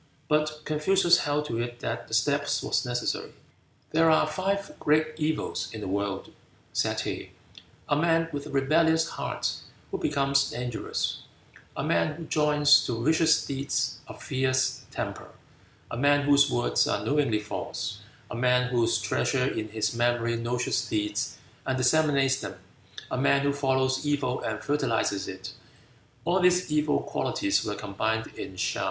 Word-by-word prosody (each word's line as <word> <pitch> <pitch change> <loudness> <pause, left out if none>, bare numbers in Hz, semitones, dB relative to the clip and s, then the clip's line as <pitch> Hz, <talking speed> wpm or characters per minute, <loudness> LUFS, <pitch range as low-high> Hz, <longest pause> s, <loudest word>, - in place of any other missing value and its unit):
But 155 +1 +1
Confucius 175 +3 +3
held 145 +1 0
to 115 -5 -3
it 120 0 -4
that - - -4
the - - -2
step - - +2 0.2
was - - +1
necessary. 120 0 -2 0.6
"There 165 +1 +4
are 155 - +5
five 195 +5 -2
great 155 +1 +2
evils 155 0 -2
in 110 - -7
the 105 - -5
world," 100 0 -3 0.4
said - - 0
he: - - -5 0.5
"a 145 - +2
man 165 +1 +2
with 145 0 -4
a - - -9
rebellious 160 +4 +3
heart - - -3 0.3
who - - -2
becomes 140 -1 +1
dangerous; 120 -2 -3 0.6
a - - -1
man 85 - +1
who 165 +2 -8
joins 150 -1 +4
to 115 -1 -2
vicious 160 0 +4
deeds 140 0 -2
a - - -9
fierce 130 0 0
temper; - - -5 0.6
a - - -3
man 145 +2 +3
whose 140 0 +5
words 120 -2 +1
are 105 - -1
knowingly 140 -3 +2
false; 105 0 -5 0.3
a - - -4
man 125 +1 +2
who 120 -2 +2
treasures 120 +4 0
in 110 - -3
his 110 +1 -1
memory 120 0 +1
noxious 120 +3 -1
deeds 105 0 -2 0.3
and 130 -1 0
disseminates 135 0 +3
them; - - -6 0.6
a 130 - -1
man 140 +1 +3
who 140 0 +1
follows 130 -1 +1
evil 140 -4 0
and 110 0 -4
fertilizes 115 -7 0
it. 95 0 -7 0.7
All 180 +2 +2
these 180 -2 +3
evil 150 -1 +2
qualities 300 -1 0
were 105 - -3
combined 110 +3 -2
in 95 - -7
Shaou. 95 - -1
135 Hz, 155 wpm, -27 LUFS, 120-150 Hz, 0.7 s, are